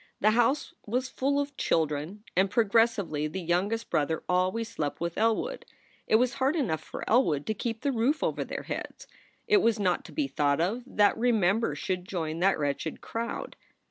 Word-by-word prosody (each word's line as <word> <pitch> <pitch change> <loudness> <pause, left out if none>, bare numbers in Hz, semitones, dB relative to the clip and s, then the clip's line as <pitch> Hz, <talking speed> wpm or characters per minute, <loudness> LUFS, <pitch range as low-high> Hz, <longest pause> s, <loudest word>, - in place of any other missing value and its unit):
The 215 - +4
house 240 +6 +2
was 250 +4 -1
full 280 +2 0
of 285 0 -3
children, 160 +6 -1
and 190 +2 +3
progressively 215 -8 +2
the 185 +5 -5
youngest 190 +6 -1
brother 155 +2 0
al 180 +1 +2
ways 230 +1 -3
slept 150 -10 -3
with 170 0 -3
Elwood. 230 - 0 0.4
It - - +4
was 245 +2 +3
hard 270 +4 +3
enough 210 - 0
for - - -8
Elwood 165 - +3
to 220 - 0
keep 225 +1 -4
the 280 - +1
roof 260 +6 +1
over - - 0
their - - -6
heads. - - -6 0.4
It 425 -2 +5
was 230 - +2
not 185 -3 +1
to - - -11
be 300 -3 -1
thought 145 - +1
of 200 +9 0
that 205 -5 +3
Remember 220 -6 +2
should 180 +4 -3
join 160 -4 -3
that 195 +2 +3
wretched 145 +2 -2
crowd. 230 +1 -4
210 Hz, 185 wpm, -28 LUFS, 170-235 Hz, 0.4 s, It